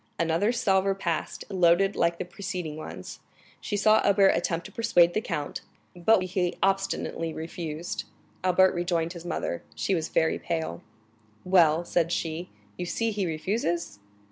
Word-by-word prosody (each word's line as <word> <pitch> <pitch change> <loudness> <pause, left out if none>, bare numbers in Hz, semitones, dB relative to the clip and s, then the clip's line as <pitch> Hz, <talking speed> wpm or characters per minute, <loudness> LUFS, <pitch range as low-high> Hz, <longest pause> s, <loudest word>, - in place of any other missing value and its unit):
Another 165 +6 +2
salver 195 -4 +2
passed, 170 -4 -3
loaded 185 +1 +3
like 170 0 +1
the 185 - -4
preceding 180 -3 -5
ones; 155 - -8 0.4
she 205 - -3
saw 215 +1 +5
Albert 200 -1 +5
attempt 170 0 0
to - - -9
persuade 175 -6 +3
the 215 - 0
count, 145 -8 -4 0.3
but 185 +3 +3
he 180 -1 -1
obstinately 195 -4 0
refused. 160 0 -5 0.4
Albert 185 +1 +4
rejoined 175 -1 -1
his 170 -1 -10
mother; 85 - -3
she 195 - 0
was 165 -3 -1
very 160 - +1
pale. 160 - -3 0.6
"Well," 170 -3 +4
said 170 -1 +1
she, 165 +1 -2 0.3
"you 180 - -2
see 230 +6 -1
he 200 -3 -1
refuses?" 170 - -2
175 Hz, 145 wpm, -27 LUFS, 165-195 Hz, 0.6 s, saw